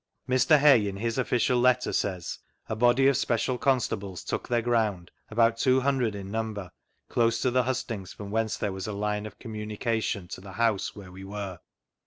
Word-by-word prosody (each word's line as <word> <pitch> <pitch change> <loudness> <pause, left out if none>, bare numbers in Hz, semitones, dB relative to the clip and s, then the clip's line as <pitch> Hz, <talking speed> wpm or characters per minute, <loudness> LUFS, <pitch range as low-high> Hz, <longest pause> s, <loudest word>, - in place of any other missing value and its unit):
Mr. 130 +4 +5
Hay, 135 -8 +6
in 100 -1 -4
his 115 +4 -2
official 125 0 +2
letter, 125 0 +3
says: 90 -4 -2
" - - -44
A - - 0
body 120 +4 +4
of 140 - +4
special 120 +2 0
constables 110 -8 0
took - - -3
their 120 -1 +1
ground, 110 -7 0 0.2
about 115 +1 +3
two 130 0 +3
hundred 130 -5 +1
in 100 -1 -7
number, 110 -4 -3 0.4
close 115 -1 +2
to 130 - +2
the 130 +1 +3
hustings, 115 -7 -3
from 100 -1 -8
whence 110 0 0
there 100 - -2
was 95 +1 -5
a 105 - -3
line 105 +1 -2
of - - -13
com 115 -3 -9
munication 105 -2 -2
to - - -6
the 95 0 -10
house 110 -1 0
where 95 -3 -10
we 95 +1 -10
were." 95 -2 -6
110 Hz, 200 wpm, -27 LUFS, 100-125 Hz, 0.4 s, Hay